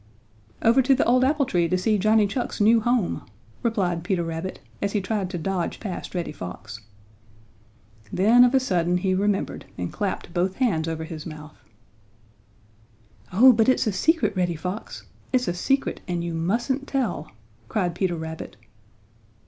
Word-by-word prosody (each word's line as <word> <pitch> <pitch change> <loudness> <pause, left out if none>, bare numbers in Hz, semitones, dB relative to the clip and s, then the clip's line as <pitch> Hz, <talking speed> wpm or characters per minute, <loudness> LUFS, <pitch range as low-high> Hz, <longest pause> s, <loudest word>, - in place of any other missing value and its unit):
"Over 235 +4 +5
to 265 +1 +4
the 265 - +1
old 250 +2 +4
apple 280 +1 +2
tree 175 -7 +1
to 185 - +2
see 210 +3 +1
Johnny 215 +1 +4
Chuck's 240 +5 -3
new 225 +2 +5
home," 240 -4 0 0.4
replied 185 -8 0
Peter 180 -1 0
Rabbit 165 +3 -5 0.2
as 200 0 -1
he 210 - +2
tried 195 -1 -2
to 180 - -4
dodge 180 +1 -2
past 195 -3 -6
Reddy 175 -3 -2
Fox. 110 0 -8 1.3
Then 225 +6 +5
of 250 +2 +4
a - - +6
sudden 180 -8 +1
he 185 +1 0
remembered 200 +1 -1
and 90 -1 -4
clapped 195 -4 -3
both 185 +1 0
hands 180 -12 +1
over 160 0 -3
his 160 -1 -7
mouth. 155 -1 -10 1.7
"Oh, 250 +8 +7
but 225 +1 +3
it's 255 - +3
a 215 - 0
secret, 225 - +2
Reddy 175 -2 0
Fox. 180 +7 -6 0.3
It's 250 -2 +1
a 175 - 0
secret, 270 +10 0
and 175 -2 -2
you 170 -1 -3
mustn't 235 - -1
tell!" 270 -3 -2 0.4
cried 180 -5 0
Peter 175 0 -1
Rabbit. 160 -5 -7
190 Hz, 165 wpm, -24 LUFS, 170-235 Hz, 1.7 s, Oh